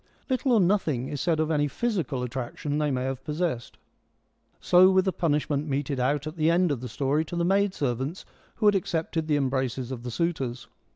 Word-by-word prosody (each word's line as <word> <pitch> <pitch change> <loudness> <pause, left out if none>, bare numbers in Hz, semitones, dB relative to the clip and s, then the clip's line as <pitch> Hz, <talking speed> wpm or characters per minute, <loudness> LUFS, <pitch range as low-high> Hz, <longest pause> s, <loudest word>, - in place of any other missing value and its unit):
Little 255 0 +2
or 225 - +5
nothing 170 -10 +1
is 145 -3 -4
said 160 +1 +1
of 155 0 +1
any 145 -1 +2
physical 150 - -2
attraction 130 +4 -3
they 150 -1 +1
may 130 -2 -1
have 135 -1 -3
possessed. 150 -6 -3 0.8
So 180 +1 +6
with 190 0 +3
the 190 - +1
punishment 150 -2 0
meted 140 -1 -2
out 140 +3 0
at 155 +2 -6
the 155 0 +3
end 175 0 +3
of 130 -4 -2
the 125 - -6
story 140 +6 0
to 175 - -6
the 170 0 +1
maid 195 +1 +2
servants 135 - -2 0.3
who 220 - -2
had 205 - +6
accepted 165 -3 -1
the 150 -2 +2
embraces 130 -2 -1
of 125 -3 -5
the 125 - -5
suitors. 130 -5 -2
150 Hz, 205 wpm, -26 LUFS, 130-175 Hz, 0.8 s, So